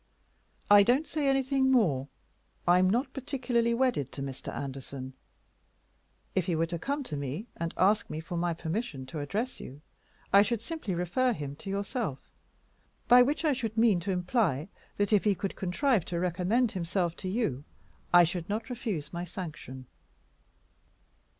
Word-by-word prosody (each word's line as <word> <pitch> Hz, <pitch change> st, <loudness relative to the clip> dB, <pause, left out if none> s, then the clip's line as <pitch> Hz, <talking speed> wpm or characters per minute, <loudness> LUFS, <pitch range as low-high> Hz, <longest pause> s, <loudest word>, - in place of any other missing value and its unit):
I 205 Hz, 0 st, +8 dB
don't 250 Hz, +9 st, +3 dB
say 300 Hz, -2 st, -1 dB
anything 270 Hz, 0 st, +2 dB
more. 155 Hz, -, +3 dB, 0.6 s
I 175 Hz, +1 st, +6 dB
am 185 Hz, 0 st, +4 dB
not 240 Hz, +8 st, 0 dB
particularly 245 Hz, -4 st, 0 dB
wedded 240 Hz, -, +1 dB
to 140 Hz, -, -5 dB
Mr. 135 Hz, -1 st, -6 dB
Anderson. 135 Hz, -1 st, -6 dB, 1.2 s
If 185 Hz, -3 st, 0 dB
he 175 Hz, -, +1 dB
were 165 Hz, +1 st, +2 dB
to 170 Hz, 0 st, -4 dB
come 280 Hz, -, -2 dB
to 155 Hz, -, -5 dB
me 145 Hz, -, -4 dB
and 165 Hz, 0 st, -3 dB
ask 200 Hz, +3 st, +3 dB, 0.2 s
for 175 Hz, -, -6 dB
my 170 Hz, 0 st, 0 dB
permission 165 Hz, -, -4 dB
to 155 Hz, +4 st, -6 dB
address 210 Hz, -, -3 dB
you, 135 Hz, +3 st, -9 dB, 0.5 s
I 200 Hz, -, +9 dB
should 220 Hz, +2 st, +1 dB
simply 275 Hz, -, -4 dB
refer 210 Hz, +9 st, +1 dB
him 145 Hz, -7 st, -5 dB
to 195 Hz, -, -8 dB
yourself, 200 Hz, -, -3 dB, 0.8 s
by 245 Hz, +1 st, +8 dB
which 290 Hz, +6 st, +1 dB
I 300 Hz, -, +4 dB
should 230 Hz, -4 st, -4 dB
mean 225 Hz, -5 st, +4 dB
to 175 Hz, +4 st, -5 dB
imply 180 Hz, -, 0 dB, 0.3 s
that 205 Hz, +1 st, +1 dB
if 205 Hz, -, +4 dB
he 205 Hz, -2 st, +3 dB
could 195 Hz, +1 st, -4 dB
contrive 205 Hz, -, +1 dB
to 170 Hz, -1 st, -3 dB
recommend 185 Hz, +7 st, +1 dB
himself 175 Hz, -1 st, -1 dB
to 185 Hz, -, -4 dB
you 185 Hz, -, -1 dB, 0.5 s
I 175 Hz, 0 st, +8 dB
should 175 Hz, +1 st, -2 dB
not 220 Hz, +5 st, -3 dB
refuse 200 Hz, -, -4 dB
my 175 Hz, 0 st, -3 dB
sanction." 155 Hz, -8 st, -7 dB
190 Hz, 165 wpm, -29 LUFS, 165-240 Hz, 1.2 s, I